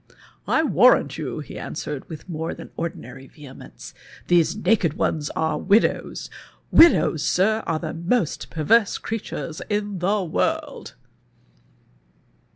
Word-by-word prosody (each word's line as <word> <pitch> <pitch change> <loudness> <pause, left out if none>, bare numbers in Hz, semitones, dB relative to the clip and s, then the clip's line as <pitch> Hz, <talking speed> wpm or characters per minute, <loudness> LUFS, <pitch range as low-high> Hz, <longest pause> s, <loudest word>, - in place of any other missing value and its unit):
" - - -32
I - - +2
warrant - - +4
you," - - -4
he - - -9
answered, 145 -3 -6
with 160 0 -9
a - - -8
more 160 +1 -4
than - - -11
ordinary 135 -5 -6
\'ehemence, 145 -4 -12 0.4
"these 175 -1 +3
naked 190 -6 +1
ones 150 -4 -1
are 160 0 -1
widows— 205 +4 +1 0.4
widows. 320 - +5
Sir, 215 +4 +2
are 165 - 0
the 155 -1 -5
most 170 +2 -1
perverse 200 +8 +2
crea 225 +1 -4
tures 160 -5 -7
in 205 -2 -2
the 195 +3 0
world." 165 - -2
170 Hz, 135 wpm, -23 LUFS, 155-205 Hz, 0.4 s, widows